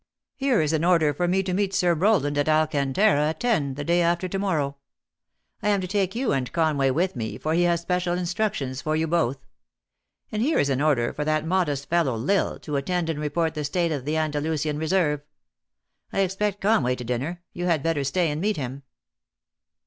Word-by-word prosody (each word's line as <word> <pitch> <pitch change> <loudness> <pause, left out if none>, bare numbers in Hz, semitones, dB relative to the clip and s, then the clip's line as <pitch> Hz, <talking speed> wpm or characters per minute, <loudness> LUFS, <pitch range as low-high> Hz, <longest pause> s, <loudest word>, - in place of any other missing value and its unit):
Here 270 - +2
is 155 0 0
an 160 0 +1
order 165 -4 +3
for 175 +5 -1
me 190 +2 +2
to 185 -1 -2
meet 195 0 0
Sir 175 -2 +3
Rowland 160 -5 +2
at 145 +1 +1
Alcantara, 155 +3 +2
at 160 - -5
ten, 155 - 0
the 145 - -4
day 170 +3 +2
after 170 +2 +1
to 195 +2 -3
mor 190 -4 0
row. 140 -1 -2 0.8
I 210 - 0
am 200 -1 +3
to 185 - -3
take 195 +1 0
yon 250 - 0
and 130 -2 -2
Conway 155 -5 +2
with 175 +7 0
me, 110 -3 -4
for 155 - -2
he 170 - +2
has 170 -1 +2
special 180 0 -1
instructions 175 - -2
for 155 0 -1
yon 160 0 -1
both. 140 -6 0 0.9
And 215 - -2
here 300 +7 +2
is 145 - +2
an 135 +1 0
order 140 -6 +2
for 150 - -3
that 155 0 0
modest 160 -6 0
fellow 165 -8 +1
L 115 - -1
Isle 200 - +1
to 150 -2 -3
attend 165 +3 -1
and 150 - -5
re 150 0 -2
port 160 +1 0
the 150 -1 -3
state 170 +3 0
of 140 -4 -3
the 150 +2 -1
Andalnsian 150 -1 -1
reserve. 160 -3 +1 0.9
I 195 - +1
expect 195 +2 -1
Conway 195 - +2
to 125 - -7
dinner. 135 +9 -3
You 175 - -4
had 165 -5 +1
better 165 -4 0
stay 160 +4 +1
and 150 +2 -3
meet 210 +2 0
him." 135 0 -5
160 Hz, 215 wpm, -25 LUFS, 145-185 Hz, 0.9 s, order